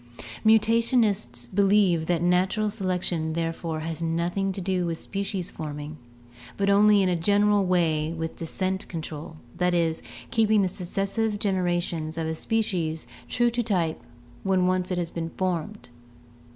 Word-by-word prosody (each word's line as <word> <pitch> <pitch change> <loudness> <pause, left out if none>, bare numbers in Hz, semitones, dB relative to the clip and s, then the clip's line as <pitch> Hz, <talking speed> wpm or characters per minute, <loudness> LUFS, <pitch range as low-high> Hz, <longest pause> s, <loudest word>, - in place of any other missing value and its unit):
Mutationists 220 - +3
believe 195 - +3
that 175 -1 +1
natural 185 +4 +2
selection 180 -5 -1
therefore 165 -1 -3
has 165 +1 -4
nothing 170 +4 0
to 190 - -5
do 185 -1 0
with 165 -1 -2
species 195 0 -4
forming, 150 0 -6 0.6
but 200 0 +2
only 205 0 +6
in 185 - +2
a 180 - +2
general 205 +3 +3
way 160 -4 +1
with 160 -1 -4
descent 185 +3 -3
control, 160 -2 -6 0.2
that 180 0 +2
is, 165 -2 +1 0.3
keeping 215 -2 +3
the - - +2
successive 195 +4 -2
generations 175 -5 -1
of 165 - -1
a 160 - -1
species 170 -4 -1 0.2
true 240 -1 +2
to 240 +1 0
type 180 - 0 0.4
when 190 -2 +2
once 185 0 +1
it 180 - -1
has 170 -2 -2
been 165 -1 -4
formed. 185 +2 -3
180 Hz, 145 wpm, -26 LUFS, 165-200 Hz, 0.6 s, only